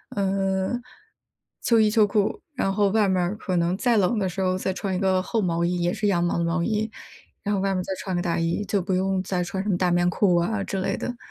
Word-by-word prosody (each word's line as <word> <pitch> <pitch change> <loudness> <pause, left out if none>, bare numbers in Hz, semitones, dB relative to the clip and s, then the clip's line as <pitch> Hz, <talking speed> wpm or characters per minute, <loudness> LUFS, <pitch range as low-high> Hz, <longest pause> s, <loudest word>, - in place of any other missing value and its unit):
呃， 195 -1 0 0.9
秋 230 -1 +3
衣 215 -1 +5
秋 215 -1 +4
裤， 210 - 0
然 195 -7 0
后 200 0 +2
外 210 0 +3
面 185 -1 +2
儿 180 +4 -1
可 185 -4 -2
能 170 +2 +1
再 240 +1 +2
冷 200 +3 +2
的 195 - 0
时 185 +2 -4
候 185 0 +1
再 190 0 -2
穿 190 0 -3
一 - - -1
个 190 -1 +2
厚 210 +5 -2
毛 170 -3 0
衣， 175 +1 0
也 175 0 +1
是 210 0 -1
羊 175 -4 +2
毛 175 - 0
的 - - +1
毛 170 +1 0
衣， 215 +2 0 0.5
然 205 0 -1
后 195 - 0
外 195 - +1
面 - - -1
儿 - - -2
再 190 - -3
穿 190 - -4
个 - - 0
大 175 -2 -1
衣， 165 +4 0
就 200 -2 0
不 190 - -3
用 190 0 0
再 185 -2 -1
穿 190 +2 -3
什 205 - -5
么 185 - +2
大 180 -1 +2
棉 175 0 +3
裤 180 0 +2
啊 195 +4 0
之 195 -1 -3
类 - - 0
的。 245 - -4
190 Hz, 290 characters per minute, -24 LUFS, 180-205 Hz, 0.9 s, 衣